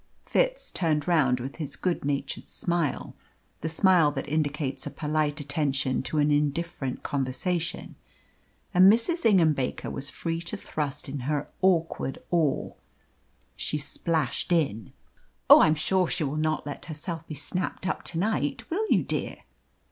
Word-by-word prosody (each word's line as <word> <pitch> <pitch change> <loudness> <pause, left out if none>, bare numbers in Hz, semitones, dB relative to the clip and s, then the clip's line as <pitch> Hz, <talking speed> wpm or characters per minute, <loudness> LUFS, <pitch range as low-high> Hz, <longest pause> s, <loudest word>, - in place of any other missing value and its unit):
Fitz - - 0
turned 155 -4 0
round 140 -8 +3
with 130 +3 -6
his 145 -3 -3
good 180 +4 -1
natured 140 -1 -2
smile 170 -5 -1 0.5
the 160 - -3
smile 170 -1 +4
that 140 -1 -4
indicates 145 -3 -1
a - - -2
polite 150 -1 -1
attention 140 -3 0
to 155 - -3
an 150 0 +3
indifferent 145 -2 -1
conversation 155 +6 -2 0.8
and 185 +2 +8
Mrs. 235 +6 +2
Ingham 175 -7 +5
Baker 135 -3 -3
was 140 +1 -5
free 165 +4 -3
to 170 +5 -4
thrust 145 -6 -4
in 140 +1 -4
her 150 -1 -1
awkward 165 -7 +1
oar. 160 -6 +1 0.8
She 150 - -2
splashed 155 0 -1
in. 135 - +1 0.6
"Oh, - - +12
I - - +6
am 155 - +3
sure 185 +4 +1
she 160 - -1
will 140 0 -2
not 155 -1 0
let 145 - -6
herself 165 +1 -5
be 155 - -6
snapped 180 +5 -3
up - - -1
to 165 - -3
night; 180 -6 -1
will 425 +6 0
you, - - +4
dear?" - - -3
155 Hz, 155 wpm, -27 LUFS, 145-170 Hz, 0.8 s, Oh